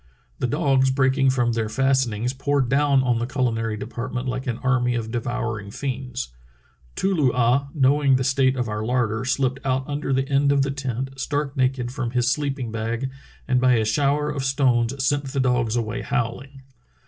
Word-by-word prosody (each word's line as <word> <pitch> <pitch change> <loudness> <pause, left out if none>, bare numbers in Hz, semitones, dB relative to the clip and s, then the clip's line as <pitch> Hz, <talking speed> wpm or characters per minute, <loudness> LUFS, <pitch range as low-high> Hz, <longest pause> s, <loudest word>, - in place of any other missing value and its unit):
The 125 - 0
dogs 135 -2 +2
breaking 130 0 +2
from 120 -2 +1
their 115 -2 -1
fast 135 +2 +2
enings 115 +5 -3
poured 140 -2 0
down 140 -1 +3
on 120 -2 +1
the 120 - -2
culinary 115 -5 -1
department 125 +3 -5
like 130 +1 -3
an 120 -2 -1
army 125 -2 +2
of 115 -1 -3
devouring 115 -3 -3
fiends. 130 +1 -4 0.7
Too 195 +1 +1
loo 145 -8 +3
ah, 125 +3 +2
knowing 140 0 +4
the 130 - +1
state 130 0 +2
of 125 -2 -2
our 105 0 -3
larder, 120 -1 0
slipped 130 +1 0
out 130 -1 -1
under 145 -1 -3
the 135 0 +1
end 140 +1 +2
of 140 -1 +3
the 135 - -1
tent, 135 -1 -4
stark 145 0 -2
naked 130 -2 0
from 130 -2 -3
his 120 0 +1
sleeping 135 -4 -2
bag, 115 +4 -3 0.4
and 125 -1 +2
by 130 0 +5
a 110 -2 +2
shower 145 +5 +1
of 140 -2 -3
stones 130 -1 +1
sent 145 +1 +1
the 135 0 -3
dogs 125 -3 +1
away 115 +1 -2
howling." 130 +3 -3
130 Hz, 185 wpm, -23 LUFS, 120-135 Hz, 0.7 s, by